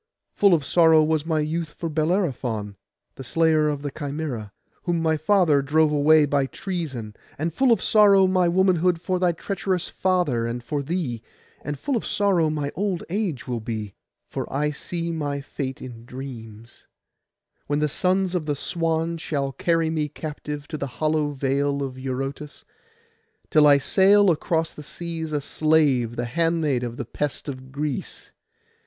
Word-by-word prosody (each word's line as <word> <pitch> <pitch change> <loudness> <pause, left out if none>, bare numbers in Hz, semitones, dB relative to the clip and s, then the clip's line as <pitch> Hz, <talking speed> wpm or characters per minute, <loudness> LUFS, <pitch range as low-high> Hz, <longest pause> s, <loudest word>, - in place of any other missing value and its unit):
Full 200 -4 +5
of 150 -4 -2
sorrow 160 -1 +5
was 155 0 0
my 160 -2 +1
youth 160 +1 -2
for 170 - -5
Bellerophon, 150 - -1 0.4
the 135 - -9
slayer 155 +2 +2
of 145 -1 -3
the 145 - -3
Chimæra, 140 -7 -4 0.3
whom 175 -2 -1
my 160 -1 +2
father 155 -2 +3
drove 155 +2 +2
away 150 +1 +5
by 140 -1 +1
treason; 135 - -5 0.2
and 160 +2 -2
full 265 +6 +3
of 230 - +3
sorrow 200 -3 +6
my 185 -1 +3
womanhood, 180 -1 +2
for 185 +1 -1
thy 180 -1 +3
treacherous 185 +1 -2
father 175 -11 0
and 120 +1 -4
for 145 +3 -2
thee; 140 -7 -3 0.4
and 145 0 -4
full 270 - -2
of 230 - -1
sorrow 190 -6 +2
my 145 -2 -2
old 195 -3 -2
age 190 - -2
will 120 -2 -2
be 110 -3 -5 0.3
(for - - -5
I 150 +2 0
see 170 +2 -4
my 145 -3 -2
fate 135 -1 -5
in 120 -2 -9
dreams), 120 -3 -10 0.8
when 145 - 0
the 150 0 +2
sons 185 +4 0
of 170 -4 -2
the 145 - 0
Swan 165 +1 -1
shall 140 -3 -2
carry 165 +2 +1
me 155 -2 -1
captive 150 -1 -6
to 155 - -5
the 140 - -2
hollow 155 -1 +1
vale 140 0 0
of 130 -1 -6
Eurotas, 135 +3 -5 0.9
till 150 -1 +6
I 145 -1 +7
sail 195 +6 +5
across 160 0 -1
the - - -10
seas 165 +1 -6
a 150 -1 -1
slave, 145 -6 +2
the 120 - -2
handmaid 160 -1 0
of 120 -1 -5
the 130 - -4
pest 145 +6 -4
of 130 -1 -7
Greece. 150 +5 -4
155 Hz, 165 wpm, -24 LUFS, 140-170 Hz, 0.9 s, I